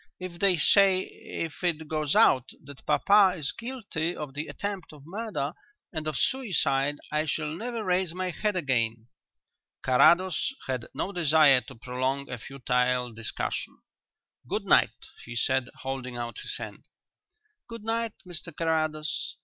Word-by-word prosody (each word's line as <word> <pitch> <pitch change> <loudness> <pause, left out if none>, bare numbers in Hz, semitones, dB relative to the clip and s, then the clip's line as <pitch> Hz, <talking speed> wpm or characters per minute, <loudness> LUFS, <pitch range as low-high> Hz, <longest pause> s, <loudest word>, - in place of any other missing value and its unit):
If 180 -2 -7
they 195 -3 +4
say 190 +4 +5
if 165 -3 -7
it 160 -3 0
goes 155 -2 0
out 130 - +5
that 140 -1 -13
papa 195 +5 +5
is 150 -2 -2
guilty 205 -9 -3
of 150 -3 -6
the 150 +3 -4
attempt 200 -3 -5
of 145 -2 -14
murder, 175 -6 -3 0.4
and 155 -2 -3
of 155 -3 -2
suicide, 150 - +2 0.2
I 155 +1 +1
shall 150 +1 -1
never 230 +3 -4
raise 185 -2 +1
my 185 +1 -2
head 210 +3 -1
again." 120 -8 0 0.7
Carrados 170 - +4
had 130 -3 -3
no 195 - -2
desire 155 -6 +5
to - - -12
prolong 130 +3 -2
a 125 - -4
futile 125 -1 0
discussion. 115 0 -4 0.7
"Good - - -1
night," - - +3 0.2
he 120 - -8
said, 130 +2 +1
holding 130 -2 -4
out 120 -1 -5
his - - -5
hand. - - -8 0.8
"Good 230 -2 -8
night, 230 0 -1
Mr 175 -3 -6
Carrados." 155 -2 -1
155 Hz, 145 wpm, -28 LUFS, 130-185 Hz, 0.8 s, say